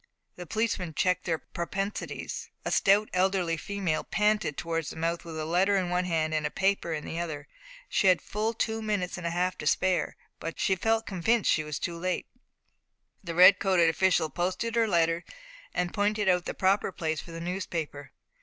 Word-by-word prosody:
The 180 -1 -9
policeman 205 -7 -1
checked 180 +2 +1
their 165 -3 0
propensities. 195 +5 -4 0.2
A - - -1
stout 205 +2 +4
elderly 185 -2 +1
female 185 -2 -2
panted 210 -7 +1
towards 165 -4 -2
the - - -8
mouth 165 +1 -2
with 165 -2 -7
a 155 - -3
letter 185 +5 +2
in 180 -2 -1
one 180 0 +1
hand 160 -3 0
and 155 -1 0
a - - 0
paper 195 -3 0
in 155 -2 -3
the 165 - -4
other. 155 -4 -4 0.4
She 195 - +2
had 185 - +6
full 220 +2 -2
two 225 0 -1
minutes 205 -5 -2
and 170 - -3
a - - 0
half 180 +2 -1
to 150 - -3
spare, 185 +3 +1 0.2
but 165 - -6
felt 225 +4 +1
convinced 205 +4 +1
she 155 - +2
was 150 -2 -4
too 170 -1 -4
late. 185 +1 -1 1.0
The 170 -2 -5
red 185 +2 +8
coated 185 -4 +4
official 165 -2 +2
posted 185 +8 -2
her 230 -1 +3
letter, 170 -2 +2 0.5
and 180 -1 -2
pointed 210 0 +1
out 180 -1 +3
the - - -4
proper 195 +1 +2
place 160 -3 -2
for - - -14
the 165 - -6
newspaper. 165 -5 -4
180 Hz, 190 wpm, -28 LUFS, 165-195 Hz, 1.0 s, red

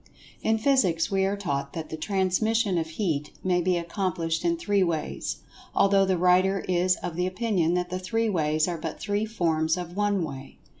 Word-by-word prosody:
In 220 0 +2
Physics 210 -10 +2
we 195 0 +2
are 200 +1 -1
taught 140 -8 -3
that 160 -1 -5
the - - -4
"Transmission" 195 +3 +1
of 160 - -2
Heat 160 -5 -2
may 180 -1 +2
be 180 0 +1
accomplished 170 -2 -2
in 340 0 +1
three 205 - +1
ways, 165 -4 -2 0.3
although 195 0 +4
the 190 -1 +1
writer 185 +2 +3
is 180 0 +2
of 175 -2 -4
the 180 +1 0
opinion 185 -4 0
that 180 0 -2
the 185 - -2
three 225 +5 -1
ways 155 -5 +1
are 170 -2 -3
but 160 0 -5
three 205 +1 -1
forms 165 -5 0
of 175 -1 -6
one 205 -2 +1
way. 135 -3 -7
180 Hz, 190 wpm, -26 LUFS, 165-200 Hz, 0.3 s, although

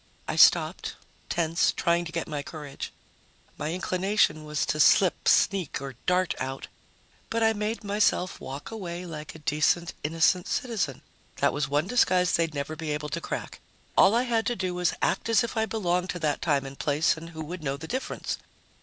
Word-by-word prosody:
I - - -2
stopped, - - +4 0.3
tense, 165 0 +2
trying 170 0 +1
to 165 - -6
get 170 -1 -3
my 150 -2 -3
courage. 145 -2 -7 0.6
My 150 +1 -3
inclination 185 -3 +1
was 150 0 -1
to 155 - -1
slip, 180 +4 +4
sneak 190 -6 +3
or 135 0 -6
dart 180 0 +2
out, 135 +1 -4 0.6
but 230 0 0
I 225 0 +4
made 215 +2 -3
myself 200 -3 +1
walk 135 +8 -7
away 180 -5 -5
like 155 -3 -7
a 155 -2 -14
decent, 155 +3 +2
innocent 165 +4 +2
citizen. 210 - -2 0.3
That - - +2
was 145 -2 -1
one 145 +3 +1
disguise 185 -5 +3
they'd 165 -2 +1
never 145 +2 -3
be 160 -1 -5
able 150 0 -2
to - - -3
crack. - - -5 0.4
All 210 - +6
I 240 - +3
had 230 -3 0
to 240 - 0
do 185 -3 -2
was 180 -1 0
act - - 0
as 230 +2 +4
if 235 - -4
I 220 0 +1
belonged 180 -4 0
to 180 - -3
that 150 -2 0
time 145 -4 +1
and 135 0 -9
place 150 +2 +2
and 165 +1 -9
who 160 -1 -7
would 175 +3 -6
know 135 -1 -2
the 160 +3 -8
difference? 260 +7 -3
170 Hz, 190 wpm, -27 LUFS, 150-195 Hz, 0.6 s, All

